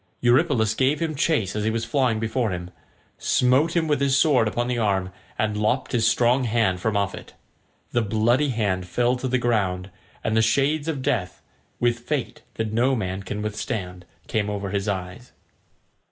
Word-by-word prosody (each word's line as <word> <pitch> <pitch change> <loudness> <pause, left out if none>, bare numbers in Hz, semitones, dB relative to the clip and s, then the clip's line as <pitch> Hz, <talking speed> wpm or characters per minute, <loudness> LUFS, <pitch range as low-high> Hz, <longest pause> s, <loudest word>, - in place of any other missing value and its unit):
Eurypylus 120 -3 +3
gave 135 +5 +1
him 165 -2 -1
chase 145 - 0
as 105 - -1
he 110 - +1
was 115 0 -2
flying 120 -2 +1
before 115 +1 -1
him, 90 -1 -5 0.5
smote 135 +7 +2
him 165 -2 +2
with 145 -2 +1
his 140 -1 +3
sword 135 -6 +4
upon 120 +3 -1
the 125 -1 -1
arm, 95 -4 0 0.3
and 110 -1 0
lopped 110 +5 0
his 120 -3 +2
strong 125 +2 +3
hand 110 -5 +1
from 105 +3 0
off 100 -1 0
it. - - -11 0.6
The 120 - +2
bloody 115 +7 +2
hand 100 -7 -1
fell 120 +7 +1
to 130 - -3
the 130 0 +1
ground, 100 -6 0 0.3
and 110 - 0
the 110 - +4
shades 140 +7 +1
of 145 -5 -2
death, 110 -11 -2 0.4
with 120 0 +1
fate 130 +1 -3
that 110 -1 -3
no 125 +4 +2
man 95 -4 -3
can 105 +2 -5
withstand, 100 -4 -4 0.2
came 105 -1 -1
over 100 -2 -3
his 100 0 -2
eyes. 95 +5 -5
115 Hz, 180 wpm, -24 LUFS, 105-130 Hz, 0.6 s, sword